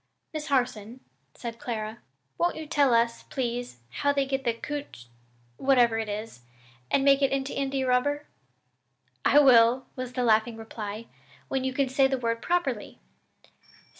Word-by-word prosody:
"Miss 310 0 -4
Harson," 245 -3 -1 0.3
said 230 -1 -7
Clara, 220 -1 -4 0.4
"won't 350 +1 +1
you 315 - -6
tell 285 -3 +3
us, 230 0 +2
please, 245 - -4
how 285 - 0
they 280 -1 +1
get 270 0 -2
the 235 - +2
caoutch 285 - -6 0.5
whatever 245 -4 +3
it 220 -1 -3
is 210 - -6 0.5
and 270 - +2
make 275 0 +5
it 275 - +3
into 270 0 -2
India 270 -1 -1
rubber?" 285 +4 +1 1.0
"I 285 - +4
will," 250 -2 +6
was 255 -1 -5
the 250 - -1
laughing 225 0 +2
reply, 220 -1 -7 0.4
"when 265 -1 -1
you 260 - -1
can 270 +1 0
say 265 +1 +3
the 265 0 -1
word 230 -2 -2
properly. 315 -11 -1
255 Hz, 155 wpm, -27 LUFS, 230-275 Hz, 1.0 s, will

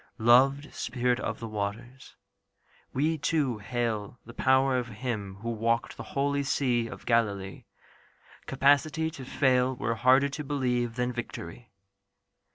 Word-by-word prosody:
Loved 135 +6 +4
spirit 125 0 -1
of 115 - -3
the 115 - -5
waters, 110 +5 -6 0.8
we 155 +4 0
too 140 -7 0
hail 110 +1 -3
The 115 - -11
power 130 +1 +3
of 120 - -4
Him 105 -4 -4
who 115 +1 -3
walked 115 +1 -1
the - - -8 0.2
holy 140 0 +1
sea 125 -4 0
Of - - -10
Galilee. 100 -5 0 0.8
Capacity 145 +4 +2
to 135 - -9
fail 130 -1 +2
Were 115 - -1
harder 130 +4 +4
to 150 +2 -5
believe 125 -4 -1
than 125 0 -1
victory. 120 -2 -7
125 Hz, 135 wpm, -28 LUFS, 115-135 Hz, 0.8 s, Loved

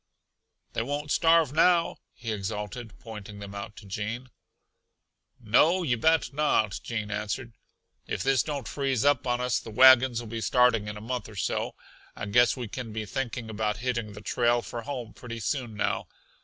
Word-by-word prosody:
"They - - 0
won't 145 +4 -3
starve 165 -4 +4
now," 170 +1 +4 0.2
he 115 -2 -5
exulted, 105 +2 -5
pointing 105 -4 -9
them 100 0 -8
out 100 +1 -7
to 105 - -12
Gene. 110 +6 -4 1.1
"No, 155 - +4
you 130 -7 +2
bet 160 +1 +2
not!" 125 -9 +1
Gene 110 -3 -4
answered. 105 +3 -3 0.5
"If - - -2
this 135 -3 +3
don't 140 -7 -4
freeze 135 -3 0
up 145 -2 +3
on 120 0 +1
us 125 0 +1
the - - -10
wagons 130 +1 +7
'll 120 - -7
be 115 +1 -5
starting 115 -1 +3
in 105 0 -5
a - - -9
month 125 +2 -4
or 110 - -12
so. 95 - -2 0.4
I - - -5
guess 120 +6 +4
we 125 -2 -4
can 120 +1 -6
be 110 0 -4
thinking 120 0 -3
about 105 -2 -1
hitting 120 -4 -1
the 105 - -10
trail 120 +2 +1
for 120 - -6
home 120 -3 -6
pretty 115 -2 -7
soon 120 -2 -2
now. 105 - -1
120 Hz, 180 wpm, -28 LUFS, 105-130 Hz, 1.1 s, wagons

